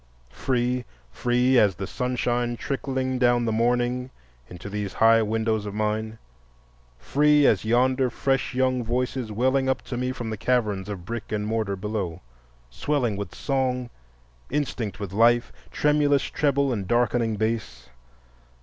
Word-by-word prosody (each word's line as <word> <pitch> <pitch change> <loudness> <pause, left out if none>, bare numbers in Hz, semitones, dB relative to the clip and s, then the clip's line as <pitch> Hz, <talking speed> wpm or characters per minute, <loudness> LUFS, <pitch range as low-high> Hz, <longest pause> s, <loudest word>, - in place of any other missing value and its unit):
Free, 125 - 0 0.3
free 125 - +2
as 100 -4 +3
the 95 +2 -4
sunshine 120 0 -1
trickling 130 -1 -2
down 120 -1 +3
the 115 - 0
morning 120 +2 0 0.4
into 90 +1 -9
these 100 -2 -4
high 115 0 +5
windows 110 -1 0
of 100 - -6
mine, 110 +1 -2 0.8
free 150 - +3
as 105 -4 +3
yonder 130 +3 +2
fresh 135 +1 -1
young 130 -1 +1
voices 125 0 -2
welling 130 +4 +1
up 130 - -1
to 120 - -5
me 125 +1 -1
from 120 -3 -5
the 110 - -4
caverns 105 -5 0
of 95 -4 -6
brick 115 0 -6
and 105 -1 -1
mortar 110 -2 -1
below—swelling 85 - -4
with 100 0 -6
song, 130 -3 -1 0.6
instinct 130 -8 -2
with 100 -3 -5
life, 120 +3 +3 0.2
tremulous 145 -2 +2
treble 140 -2 +1
and 100 -5 -3
darkening 120 -1 +1
bass. 110 +1 -3
120 Hz, 140 wpm, -25 LUFS, 105-130 Hz, 0.8 s, high